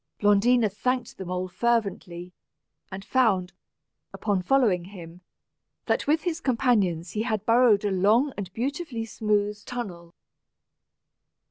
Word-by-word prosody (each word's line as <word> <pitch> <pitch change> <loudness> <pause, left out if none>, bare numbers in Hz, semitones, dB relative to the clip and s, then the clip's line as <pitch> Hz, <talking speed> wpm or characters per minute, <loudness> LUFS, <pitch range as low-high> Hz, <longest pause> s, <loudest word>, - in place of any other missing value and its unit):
Blondina 215 +3 +4
thanked 245 +4 -2
the 190 - -5
mole 180 +1 -3
fervently, 185 -5 -2 0.6
and 195 +1 -7
found, 195 -6 +1 0.6
upon 200 -3 -1
following 200 -5 +2
him, 180 -2 -11 0.6
that - - 0
with 310 +2 +2
his 345 -2 -2
companions 210 - +1
he 215 - -2
had 215 -3 -2
burrowed 230 -3 +4
a 205 - 0
long 215 +9 +2
and 195 -3 -6
beautifully 265 -1 -4
smooth 210 -2 -1
tunnel. 180 -9 -7
210 Hz, 120 wpm, -26 LUFS, 185-245 Hz, 0.6 s, Blondina